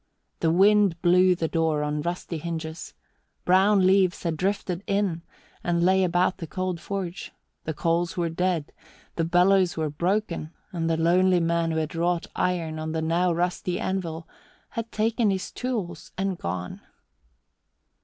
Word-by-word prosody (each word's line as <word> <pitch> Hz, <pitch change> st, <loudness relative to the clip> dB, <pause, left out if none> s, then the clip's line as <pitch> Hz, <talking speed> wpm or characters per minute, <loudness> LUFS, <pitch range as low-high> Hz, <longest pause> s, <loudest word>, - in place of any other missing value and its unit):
The 165 Hz, -, +2 dB
wind 195 Hz, 0 st, +4 dB
blew 180 Hz, +1 st, +5 dB
the 165 Hz, -1 st, -1 dB
door 160 Hz, -2 st, 0 dB
on 150 Hz, 0 st, -1 dB
rusty 170 Hz, 0 st, -4 dB
hinges; 160 Hz, 0 st, -6 dB, 0.5 s
brown 190 Hz, +1 st, +4 dB
leaves 190 Hz, -1 st, +3 dB
had 165 Hz, -2 st, -1 dB
drifted 185 Hz, +1 st, -2 dB
in 200 Hz, -4 st, 0 dB, 0.4 s
and 170 Hz, -1 st, +1 dB
lay 190 Hz, +1 st, +4 dB
about 180 Hz, +1 st, +1 dB
the 165 Hz, -, -5 dB
cold 185 Hz, 0 st, -3 dB
forge; 190 Hz, -2 st, -5 dB, 0.3 s
the 160 Hz, -, -2 dB
coals 170 Hz, +2 st, 0 dB
were 170 Hz, -1 st, +1 dB
dead, 165 Hz, -2 st, -1 dB, 0.4 s
the 165 Hz, -, 0 dB
bellows 180 Hz, +2 st, +3 dB
were 155 Hz, -2 st, -1 dB
broken, 170 Hz, -1 st, -2 dB, 0.2 s
and 165 Hz, -3 st, -2 dB
the 165 Hz, -, +1 dB
lonely 180 Hz, +2 st, +3 dB
man 170 Hz, 0 st, +1 dB
who 160 Hz, -, -1 dB
had 160 Hz, +1 st, -2 dB
wrought 170 Hz, +1 st, 0 dB
iron 165 Hz, -3 st, -1 dB
on 155 Hz, 0 st, -4 dB
the 160 Hz, -, -1 dB
now 175 Hz, +3 st, +2 dB
rusty 175 Hz, +1 st, -1 dB
anvil 170 Hz, -4 st, -3 dB, 0.4 s
had 230 Hz, -1 st, -5 dB
taken 220 Hz, 0 st, +1 dB
his 190 Hz, -1 st, -2 dB
tools 210 Hz, -10 st, -4 dB
and 190 Hz, -1 st, -2 dB
gone. 90 Hz, -, -4 dB
175 Hz, 155 wpm, -25 LUFS, 165-185 Hz, 0.5 s, blew